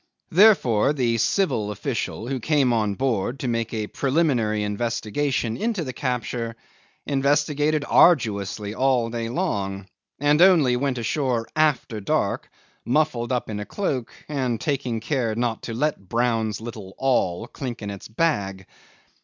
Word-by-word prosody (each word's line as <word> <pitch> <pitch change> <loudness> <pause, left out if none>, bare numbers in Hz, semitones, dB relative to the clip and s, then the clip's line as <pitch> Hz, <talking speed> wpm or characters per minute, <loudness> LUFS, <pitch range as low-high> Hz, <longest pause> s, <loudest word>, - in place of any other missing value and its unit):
Therefore 150 - +5
the 120 -5 0
civil 115 - +1
official 110 +1 -3
who 135 0 -2
came 135 -1 +2
on 105 -3 0
board 125 0 -1
to 130 - -2
make 115 -1 -1
a 110 -2 -2
preliminary 130 -6 +1
investigation 115 +3 -1
into 215 - -1
the 130 -3 -5
capture, 120 -2 -3 0.5
investigated 145 +2 +1
arduously 105 - +3
all 125 -2 +1
day 115 -1 -3
long, 100 - -2 0.3
and 145 +3 +3
only 165 -9 +6
went 130 0 -1
ashore 120 -1 -1
after 145 -8 +1
dark, 100 - -1 0.3
muffled 130 -3 0
up 125 -1 -1
in 105 -1 -4
a 105 - -4
cloak, 135 - -2 0.2
and 130 -6 -1
taking 135 -5 -1
great 110 - -5
care 125 -7 0
not 115 -1 -1
to 115 - -5
let 130 -8 -2
Brown's 115 -3 0
little 110 -4 -8
all 115 -8 +1
clink 125 -3 -6
in 100 - -4
its 100 - -8
bag. 100 -8 -1
120 Hz, 145 wpm, -24 LUFS, 110-145 Hz, 0.5 s, only